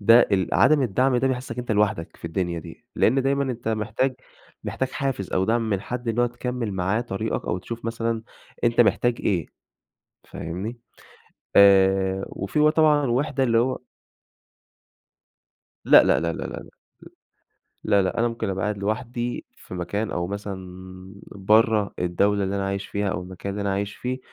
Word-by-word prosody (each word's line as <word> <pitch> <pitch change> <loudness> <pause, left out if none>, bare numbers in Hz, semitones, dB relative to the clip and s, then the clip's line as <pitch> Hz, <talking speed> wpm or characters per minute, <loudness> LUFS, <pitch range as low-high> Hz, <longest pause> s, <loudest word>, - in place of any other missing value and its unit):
ده 115 +4 +7
ال 95 -2 +1
عدم 150 -3 +5
الدعم 125 +3 +2
ده 130 +2 +2
بيحسك 125 -2 -3
إن - - -11
أنت 120 -2 -3
لوحدك 105 -6 0
في - - -18
الدنيا 85 +1 -2
دي، 85 +6 -11
لأن 135 +4 +3
دايمًا 140 +1 +1
أنت 120 -3 -4
محتاج 110 +4 0 0.5
محتاج 130 - -2
حافز 135 -10 -3
أو 95 - +2
دعم 115 +2 +1
من 100 -2 0
حد 125 +3 -5
إن 115 +1 -1
هو 120 - +4
تكمّل 120 -2 -4
معاه 95 +4 0
طريقك 110 -5 -3
أو 90 - -1
تشوف 115 +5 -8
مثلًا 115 0 -2 0.4
أنت 120 0 +3
محتاج 120 +2 +3
إيه، 85 -6 0 0.8
فاهمني؟ 95 +9 -6 0.8
آآ، 95 -1 +5
وفي 100 +10 -3
بقى 150 0 +5
طبعًا 150 -3 +4
وِحدة 135 +2 0
اللي 115 -2 +3
هو 130 +3 +1 2.1
لا، - - +8
لا، - - +3
لا، 85 0 -1
لا، - - -6
لا، - - -2
لا، - - -8 1.2
لا، 100 -2 +3
لا، 95 - -2
أنا 120 +1 +3
ممكن 115 -2 -4
أبقى 95 0 -3
قاعد 105 -1 -2
لوحدي 120 +4 -3
في - - -11
مكان 100 +4 -3
أو 85 0 -2
مثلًا 100 0 -5 0.7
برّه 105 +1 +2
الدولة 100 +3 +1
اللي 95 +1 -2
أنا 100 - -1
عايش 100 0 -3
فيها 100 0 -2
أو 90 - -3
المكان 95 +2 -7
اللي 100 +1 -4
أنا 100 -1 0
عايش 100 +1 -2
فيه، 125 +1 -3
110 Hz, 175 wpm, -24 LUFS, 95-120 Hz, 2.1 s, لا